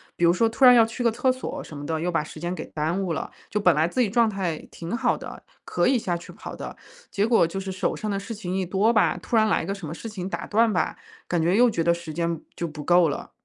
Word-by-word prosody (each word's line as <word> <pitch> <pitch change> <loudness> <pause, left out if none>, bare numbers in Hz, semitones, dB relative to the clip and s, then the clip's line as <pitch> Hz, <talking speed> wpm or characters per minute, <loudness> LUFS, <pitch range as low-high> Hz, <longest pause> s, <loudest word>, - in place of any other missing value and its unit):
比 175 - +2
如 170 - +5
说 225 +6 +3
突 255 +3 +3
然 250 - +10
要 230 -2 +7
去 235 +2 -5
个 235 - +4
厕 250 +3 +2
所 255 - -5
什 155 - -11
么 145 - -7
的， 160 0 -2
又 180 - -1
把 165 -3 +1
时 155 - -10
间 175 +2 -3
给 - - -6
耽 160 +5 0
误 170 -3 -1
了， - - -4 0.2
就 210 - -1
本 180 -4 +5
来 155 +2 +3
自 250 +8 0
己 215 - +2
状 230 +2 +3
态 185 -6 -2
挺 170 +6 -5
好 - - +1
的， - - -9 0.2
可 - - +1
以 265 - +4
下 180 -6 -1
去 170 - -12
跑 - - -8
的。 - - -7 0.4
结 200 - +1
果 230 -6 +4
就 195 +4 -4
是 190 0 -5
手 185 - -1
上 215 - -4
的 200 - -1
事 200 +4 -6
情 190 -4 -4
一 190 -1 0
多 195 +5 +2
吧， 220 - +3
突 240 - -2
然 220 -1 +5
来 215 - +2
一 - - -5
个 195 - -2
什 195 -6 -7
么 155 - -5
事 225 - -8
情 190 -4 -5
打 - - -4
断 225 +1 +3
吧， 180 - -1 0.3
感 175 -2 0
觉 170 +4 +2
又 245 +2 +6
觉 165 - -1
得 170 +1 +4
时 170 -2 -7
间 170 0 -1 0.2
就 170 - -3
不 150 -1 -8
够 175 +1 +5
了。 - - -5
185 Hz, 320 characters per minute, -25 LUFS, 170-220 Hz, 0.4 s, 然